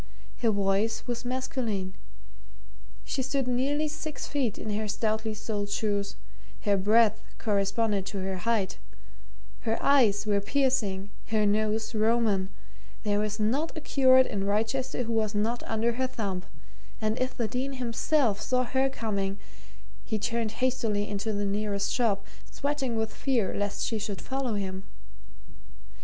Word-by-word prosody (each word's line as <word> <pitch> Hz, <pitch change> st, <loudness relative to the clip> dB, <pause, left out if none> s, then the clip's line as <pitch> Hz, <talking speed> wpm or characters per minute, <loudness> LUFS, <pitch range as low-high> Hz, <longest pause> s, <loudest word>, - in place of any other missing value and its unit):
Her 235 Hz, -, +2 dB
voice 200 Hz, +2 st, +1 dB
was 240 Hz, 0 st, -3 dB
masculine; 235 Hz, -7 st, -2 dB, 1.1 s
she 270 Hz, -, -1 dB
stood 270 Hz, 0 st, -1 dB
nearly 275 Hz, +5 st, +1 dB
six 300 Hz, -2 st, -5 dB
feet 265 Hz, -8 st, -1 dB
in 215 Hz, -, -4 dB
her 215 Hz, +1 st, -1 dB
stoutly 220 Hz, +1 st, -1 dB
soled 205 Hz, -1 st, -3 dB
shoes; 205 Hz, -1 st, -1 dB, 0.5 s
her 205 Hz, -1 st, +3 dB
breadth 215 Hz, +2 st, +4 dB, 0.2 s
corresponded 205 Hz, 0 st, +1 dB
to 200 Hz, -, -4 dB
her 190 Hz, 0 st, -2 dB
height; 205 Hz, -1 st, 0 dB, 0.8 s
her 225 Hz, -1 st, 0 dB
eyes 235 Hz, -8 st, +4 dB
were 205 Hz, -1 st, +2 dB
piercing, 205 Hz, -6 st, +1 dB, 0.2 s
her 215 Hz, -2 st, +2 dB
nose 215 Hz, +2 st, +1 dB
Roman; 215 Hz, -3 st, +2 dB, 0.5 s
there 205 Hz, -1 st, +2 dB
was 215 Hz, +1 st, -1 dB
not 270 Hz, +11 st, 0 dB
a -, -, -3 dB
curate 260 Hz, -3 st, +6 dB
in 200 Hz, -5 st, -2 dB
Wrychester 225 Hz, +5 st, 0 dB
who 230 Hz, 0 st, -2 dB
was 215 Hz, -2 st, +1 dB
not 225 Hz, +3 st, 0 dB
under 225 Hz, +1 st, +1 dB
her 260 Hz, +2 st, 0 dB
thumb, 200 Hz, -7 st, -3 dB, 0.6 s
and 220 Hz, +1 st, 0 dB
if 255 Hz, 0 st, -1 dB
the 230 Hz, -, +1 dB
Dean 260 Hz, +5 st, -2 dB
himself 245 Hz, -2 st, +1 dB
saw 255 Hz, +2 st, +2 dB
her 265 Hz, +2 st, +1 dB
coming, 200 Hz, -6 st, -2 dB, 0.7 s
he 220 Hz, -, -1 dB
turned 230 Hz, 0 st, -1 dB
hastily 220 Hz, -5 st, 0 dB
into 205 Hz, +2 st, -2 dB
the 205 Hz, -1 st, -1 dB
nearest 200 Hz, 0 st, 0 dB
shop, 205 Hz, -5 st, +1 dB, 0.2 s
sweating 280 Hz, -4 st, -1 dB
with 220 Hz, -1 st, -1 dB
fear 245 Hz, -8 st, +1 dB
lest 205 Hz, 0 st, -1 dB
she 225 Hz, -, -1 dB
should 205 Hz, -2 st, -4 dB
follow 265 Hz, -4 st, -2 dB
him. 190 Hz, -2 st, -3 dB
220 Hz, 145 wpm, -28 LUFS, 205-250 Hz, 1.1 s, curate